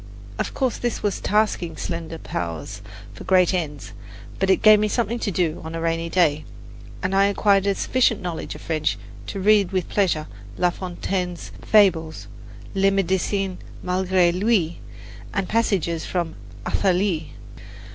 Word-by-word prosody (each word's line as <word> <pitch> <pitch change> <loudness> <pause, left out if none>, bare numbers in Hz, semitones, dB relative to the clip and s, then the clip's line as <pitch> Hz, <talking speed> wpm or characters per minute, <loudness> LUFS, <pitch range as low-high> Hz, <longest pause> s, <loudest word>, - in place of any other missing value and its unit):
Of - - -2
course 260 -3 0
this 240 -2 -2
was 205 -2 -1
tasking 210 -5 0
slender 165 -1 -4
powers 85 - -5 0.3
for - - -10
great 185 -1 +4
ends; 150 -6 -3 0.5
but 195 - +1
it 190 - +3
gave 215 -1 +8
me 215 - +2
something 235 +2 -1
to 210 - -1
do 175 -4 -1
on 160 +1 -6
a - - -3
rainy 165 0 -1
day, 155 -4 +2 0.6
and 185 +1 0
I 195 +1 +5
acquired 200 -1 +3
a 200 - +2
sufficient 245 -1 +2
knowledge 175 -3 -5
of - - -10
French 155 -2 -1 0.3
to 200 - -4
read 205 -1 +4
with 185 -2 -1
pleasure 175 -7 +1 0.3
La 180 0 +2
Fontaine's 180 0 -4
"Fables," 180 -7 +3 0.5
"Le 195 0 +3
Medecin 195 0 0 0.2
Malgre 180 -1 +2
Lui" 185 -3 +1 0.6
and 195 -2 0
passages 185 -8 0
from 170 -3 -2 0.3
"Athalie." 180 -4 0
185 Hz, 145 wpm, -23 LUFS, 165-200 Hz, 0.6 s, gave